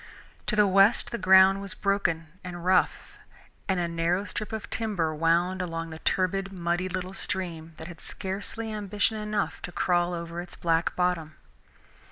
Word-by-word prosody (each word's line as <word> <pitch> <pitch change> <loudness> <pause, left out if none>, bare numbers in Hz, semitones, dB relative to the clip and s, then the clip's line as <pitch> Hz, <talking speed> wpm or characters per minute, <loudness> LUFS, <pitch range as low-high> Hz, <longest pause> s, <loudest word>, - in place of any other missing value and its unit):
To 215 - +1
the 210 -1 +5
west 195 +5 +4
the 235 - -3
ground 190 +1 +6
was 200 -1 -7
broken 185 -5 0 0.2
and 175 -1 -7
rough, 185 +1 +1 0.5
and 190 -1 +2
a 175 - 0
narrow 170 +3 0
strip 210 +3 -5
of 220 -1 -4
timber 195 -8 -1
wound 170 +4 +2
along 165 -2 -4
the 160 - -8
turbid, 195 +2 0
muddy 175 0 -1
little 185 0 -4
stream 170 -5 -3
that 160 - -8
had 175 -2 -10
scarcely 205 +4 -4
ambition 210 +1 0
enough 210 -1 -2
to - - -6
crawl 175 0 +1
over 170 0 -5
its 175 - -9
black 165 -1 +1
bottom. 175 -4 0
185 Hz, 165 wpm, -27 LUFS, 170-195 Hz, 0.5 s, ground